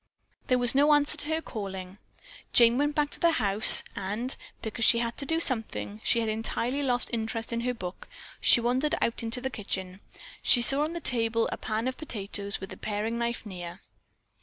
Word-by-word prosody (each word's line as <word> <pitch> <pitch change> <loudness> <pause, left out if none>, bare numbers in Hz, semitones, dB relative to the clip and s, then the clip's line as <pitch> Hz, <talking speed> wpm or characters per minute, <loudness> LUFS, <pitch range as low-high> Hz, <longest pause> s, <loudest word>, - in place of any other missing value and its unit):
As - - -41
there 255 - +1
was 245 -1 +2
no 290 +2 +3
answer 290 +1 +1
to 295 -1 -2
her 320 +1 -3
calling, 195 -2 -8 0.5
Jane 235 +1 +4
went 290 +1 -1
back 295 -1 -1
to - - -10
the 335 -1 +2
house, 210 -6 +9
and, 210 +7 -4 0.3
because 225 0 -5
she 235 - +4
had 235 0 -3
to 280 - -1
do 325 0 -1
something 220 -6 -2
(she 235 - +1
had 225 - -3
entirely 230 +5 -3
lost 250 -3 -2
interest 225 0 -4
in 235 - -3
her 250 +1 -3
book), 185 -4 -9 0.3
she - - +5
wandered 255 +6 -1
out 230 - -1
into 230 +2 -4
the 265 +1 -5
kitchen. 190 -4 -6 0.4
She 240 - +3
saw 275 +4 +3
on 315 +2 -4
the 340 - -7
table 230 -3 +2
a - - -5
pan 220 +2 -4
of 260 - -5
potatoes 200 -7 -6
with 190 - -10
the - - -10
paring 220 +2 -4
knife 235 0 -4
near. 175 -2 -9
235 Hz, 205 wpm, -26 LUFS, 215-265 Hz, 0.5 s, house